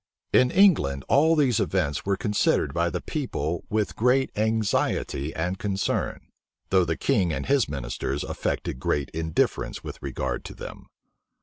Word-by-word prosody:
In 125 - +5
England, 125 - +4
all 160 +4 +4
these 135 -8 +3
events 85 -4 -1
were 100 -1 +1
considered 105 +1 +1
by - - +1
the - - -4
people 80 +4 -3
with 105 -1 -1
great 125 +3 +2
anxiety 105 -9 0
and 90 +4 -2
concern; 100 -1 -1 0.5
though 95 -2 +4
the 80 -1 -1
king 100 -11 +1
and - - -3
his 140 - +2
ministers 70 +1 -3
affected 65 - -3
great 70 +1 -1
indifference 80 0 -1
with - - -8
regard - - -3
to - - -8
them. - - -9
95 Hz, 145 wpm, -25 LUFS, 80-125 Hz, 0.5 s, In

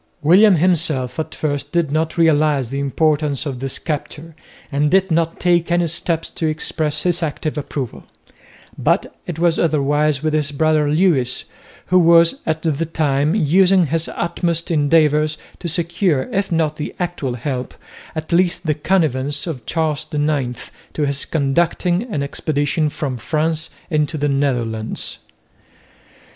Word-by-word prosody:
William 190 +6 +6
himself 160 -6 +1
at 160 - -4
first 145 -2 -2
did 170 -4 0
not 160 +2 -1
realise 150 -5 +3
the 135 +2 -3
importance 145 0 0
of 135 -4 -4
this 135 0 -2
capture, 155 +1 -5 0.4
and 145 +1 +1
did 190 +1 +2
not 165 0 0
take 175 -1 +2
any 175 0 +3
steps 165 0 -1
to 160 - -2
express 155 -1 -1
his 175 -1 +2
active 155 -1 -3
approval; 140 -4 -5 0.7
but - - 0
it 175 - -4
was 170 0 +2
otherwise 150 -2 +1
with 155 -1 0
his 150 -2 +1
brother 155 0 +2
Lewis, 145 -6 +1 0.5
who 185 - +7
was 170 -1 +5
at 160 0 -1
the 160 -1 0
time 150 -1 0
using 185 +1 +4
his 160 +2 -1
utmost 170 0 -2
endeavours 155 0 +3 0.2
to 175 - -5
secure 170 -3 0
if 195 -1 -1
not 160 -2 0
the 150 - -5
actual 175 -8 -3
help, 125 0 -4 0.4
at 155 +1 -5
least 175 0 +2
the 155 - +2
connivance, 145 -4 0
of 140 -10 -6
Charles 160 -3 -1
IX 145 -5 -2 0.2
to 150 - 0
his 140 -1 0
conducting 175 - 0
an 145 -8 -1
expedition 145 +1 -1
from 140 -4 -4
France 155 +5 -1 0.2
into 155 +1 0
the 145 0 0
Netherlands. 120 -6 -2
155 Hz, 145 wpm, -19 LUFS, 145-170 Hz, 0.7 s, who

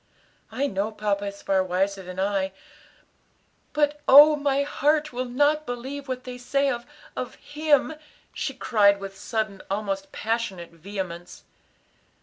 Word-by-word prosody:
"I 280 - -1
know 205 -3 -1
papa 205 -1 -1
is 200 0 -7
far 190 -1 +2
wiser 190 +2 -1
than 185 0 -8
I, 195 -1 0 1.2
but, 295 0 +1
oh, 295 +3 +9
my 280 -1 +1
heart 300 0 +1
will 250 +1 -2
not 295 +4 +2
believe 265 +4 -5
what 255 -1 -4
they 250 -1 -8
say 275 +3 +1
of 240 -1 -5 0.3
of - - -5
him!" 300 0 +1 0.4
she 270 -3 -3
cried 205 -6 +3
with 195 0 -7
sudden, 215 -1 -3
almost 195 -1 -3
passionate 215 -7 -3
vehemence. 175 0 -7
225 Hz, 135 wpm, -25 LUFS, 195-280 Hz, 1.2 s, oh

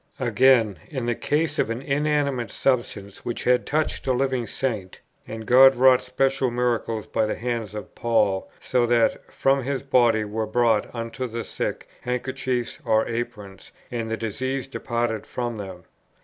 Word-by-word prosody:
Again, 120 - +3
in 130 -6 -3
the 120 - +1
case 150 +5 -1
of - - +1
an 115 +3 -3
inanimate 140 -3 0
substance, 110 -6 -2
which 120 - -4
had 125 0 +2
touched 155 -1 -1
a 130 - +3
living 130 -2 0
Saint: 105 -7 -3 0.3
"And 110 0 -7
God 135 +3 +7
wrought 130 0 +6
special 130 +1 0
miracles 120 -2 -1
by 110 - 0
the - - -2
hands 115 -3 -3
of 105 - -7
Paul; 105 -5 +1
so 125 -2 +1
that 115 -1 +1
from 135 0 +2
his 135 +1 -3
body 120 -5 +3
were 110 +1 -3
brought 115 -1 +2
unto 115 +2 -4
the 115 0 -4
sick - - -4
handkerchiefs 125 0 -2
or 110 -2 +2
aprons, 105 -5 -6 0.2
and 115 -2 -3
the 110 - -2
diseases 130 +5 -3
departed 120 -4 -3
from 120 -2 -3
them." 95 -3 -8
120 Hz, 160 wpm, -24 LUFS, 110-130 Hz, 0.3 s, God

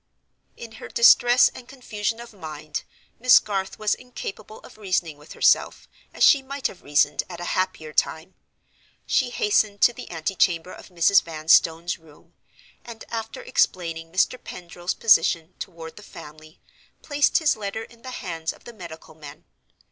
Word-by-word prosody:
In 230 -1 -9
her - - -9
distress 245 +1 +6
and 245 - -13
confusion 225 -4 -4
of 235 -1 -11
mind 155 -5 -6 0.4
Miss 250 +1 +7
Garth 195 -2 -2
was 215 0 +1
incapable 220 -4 -8
of - - -16
reasoning 180 -6 -1
with 150 +2 -14
herself, - - +2 0.2
as - - -1
she 280 - +7
might 275 +1 -8
have 180 - -2
reasoned 145 0 +2
at 175 -2 -8
a - - -6
happier 185 -5 -2
time. 160 +5 -1 0.7
She - - +1
hastened 220 - +1
to 240 - +5
the - - -10
antechamber 170 +1 0
of - - -12
Mrs. 180 +2 +4
Vanstone's 165 +1 +2
room; 155 -2 -21 0.5
and, 230 -2 -10
after 225 - -5
explaining 170 - -1
Mr. 185 +7 0
Pendril's 175 0 -6
position 165 -5 +3
toward 165 -3 -9
the - - -10
family, 155 -4 -13 0.4
placed 290 -1 +2
his 315 -4 +2
letter 215 +1 -5
in 230 0 -17
the 255 - -8
hands 165 -9 -4
of - - -21
the 240 - -11
medical 170 -6 -11
men. 150 -2 -13
185 Hz, 155 wpm, -24 LUFS, 165-230 Hz, 0.7 s, Miss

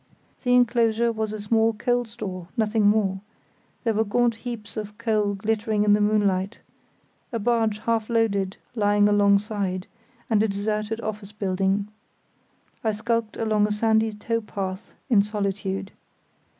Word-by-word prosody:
The 245 -1 +3
enclosure 235 -1 +3
was 220 -1 -2
a 215 - -5
small 225 +2 +2
coal 245 +3 0
store, 200 -6 -7
nothing 215 -1 +2
more; 205 -2 +2 0.6
there 230 -3 +1
were 220 +1 +2
gaunt 235 +3 +2
heaps 225 -3 -7
of 210 -1 -6
coal 215 -3 +1
glittering 215 +1 0
in 210 -1 +5
the 210 - +3
moonlight; 205 -1 +1 0.7
a 235 - -1
barge 225 -1 +1
half 225 0 -1
loaded 200 -4 +1 0.2
lying 205 -2 +3
alongside, 200 -2 +2 0.4
and 215 -3 +3
a 220 - +3
deserted 210 +2 -2
office 210 -2 -5
building. 195 0 0 1.0
I 220 -1 +1
skulked 225 0 -1
along 215 -2 +2
a - - -3
sandy 220 +1 +2
towpath 210 -3 -4 0.2
in 225 -7 +5
solitude. 200 -2 -3
215 Hz, 135 wpm, -25 LUFS, 205-225 Hz, 1.0 s, in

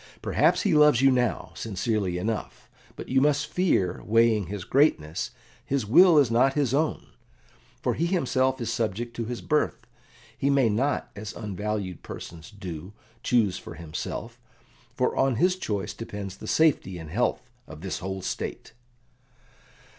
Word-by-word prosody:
"Perhaps - - +2
he 200 -6 +2
loves 150 -4 +5
you 135 - +7
now, 125 -8 0
sincerely 100 -3 -2
enough, 110 +4 -4 0.3
but - - -8
you 130 +1 +2
must 145 +1 +2
fear, 125 - 0
weighing 110 -3 +3
his 100 0 -5
greatness, 90 - +1 0.3
his 135 -4 -1
will 165 - +7
is 135 -6 +4
not 130 +3 +4
his 140 -4 +1
own; 155 +2 0 0.7
for - - +1
he 170 - 0
himself 130 -7 +1
is 115 -1 -2
subject 115 +1 -2
to 115 - -3
his 120 +1 -5
birth. 150 - 0 0.5
He 140 - 0
may 135 -4 +4
not, 130 +8 0
as 105 +1 -6
unvalued 105 -3 -4
persons 80 +1 -9
do, 95 -3 -8 0.3
choose 110 -7 +2
for - - -10
himself, 80 -2 -6 0.5
for - - 0
on 135 -2 +2
his 180 +10 +3
choice 105 - -3
depends 100 -4 -7
the 110 - -10
safety 140 - +2
and 80 -2 -9
health 120 +7 0 0.2
of 80 -1 -11
this 95 - -4
whole 95 0 -5
State." - - -5
115 Hz, 155 wpm, -26 LUFS, 95-135 Hz, 0.7 s, you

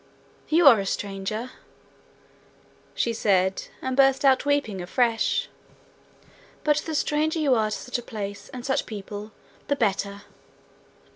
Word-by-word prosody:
You 330 +2 +4
are 245 -6 +9
a 195 - -2
stranger,' 205 +5 -3 1.4
she 235 - 0
said, 190 -3 +1 0.2
and 260 0 -1
burst 270 0 +4
out 265 +1 +4
weeping 285 -10 0
afresh, 230 +5 +1 1.2
'but 300 -1 +3
the 315 +1 -3
stranger 305 +2 +1
you 295 -4 +3
are 220 -3 +2
to 215 - -3
such 250 -1 -4
a - - -6
place 205 -3 -7
and 250 -1 -8
such 270 - 0
people 205 0 -7 0.4
the 285 - +1
better!' 200 -4 -1
235 Hz, 135 wpm, -25 LUFS, 205-275 Hz, 1.4 s, are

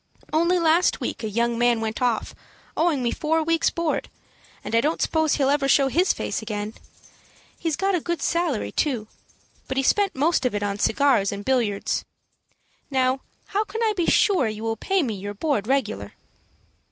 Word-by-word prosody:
Only 340 +3 +3
last 335 +1 +3
week - - -4
a 220 - -2
young 235 +2 0
man 240 -1 +3
went 220 +2 -3
off, 240 -3 0 0.4
owing 315 -6 +1
me 235 - +1
four 320 +1 0
weeks' 330 +1 +2
board, 335 -2 -2 0.5
and - - -6
I 230 - +4
don't 310 +5 0
suppose 315 -2 +1
he'll 275 -1 +2
ever 285 -1 +1
show 275 0 +4
his 350 +8 +3
face - - -3
again. 210 -1 -4 0.9
He 330 - -1
got 390 +5 0
a 355 - +1
good 345 +1 -2
salary, 335 -8 -1
too; 245 -8 -1 0.6
but 265 - -3
he 270 - +2
spent 400 +7 +2
most 300 +2 +2
of 250 -4 0
it 205 - -1
on 200 0 -2
cigars 250 -4 +2
and 200 0 -6
billiards. 235 -7 0 0.9
Now, 260 -1 +1 0.3
how 410 +2 +1
can 440 +2 -4
I 440 -1 +2
be 350 -4 0
sure 370 - +3
you 215 0 -5
will 225 0 -1
pay 380 - 0
me 235 -5 -2
your 205 +1 -6
board 240 -3 -1
regular?" 270 +1 -1
270 Hz, 185 wpm, -24 LUFS, 225-330 Hz, 0.9 s, I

